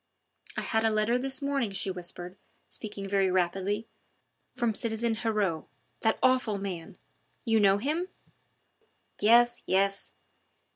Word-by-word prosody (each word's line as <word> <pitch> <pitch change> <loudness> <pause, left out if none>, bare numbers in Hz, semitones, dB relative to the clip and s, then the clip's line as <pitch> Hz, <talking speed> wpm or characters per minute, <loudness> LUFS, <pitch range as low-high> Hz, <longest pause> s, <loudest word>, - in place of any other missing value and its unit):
"I - - 0
had 220 0 0
a 225 - +4
letter 215 +3 +1
this 270 +2 -1
morning," 275 -5 0
she 195 0 -1
whispered, 180 0 -6 0.3
speaking 205 -2 -6
very 195 -1 +2
rapidly, 190 +4 0 0.7
"from 240 -3 0
citizen 230 +1 +1
Heriot 210 -8 -1 0.3
that 220 -1 +1
awful 255 -5 +3
man 190 -1 -6 0.5
you 225 -1 +3
know 200 -1 +5
him?" 305 - -1 1.1
"Yes, 240 +3 +5
yes!" 195 +1 +1
215 Hz, 125 wpm, -29 LUFS, 195-235 Hz, 1.1 s, know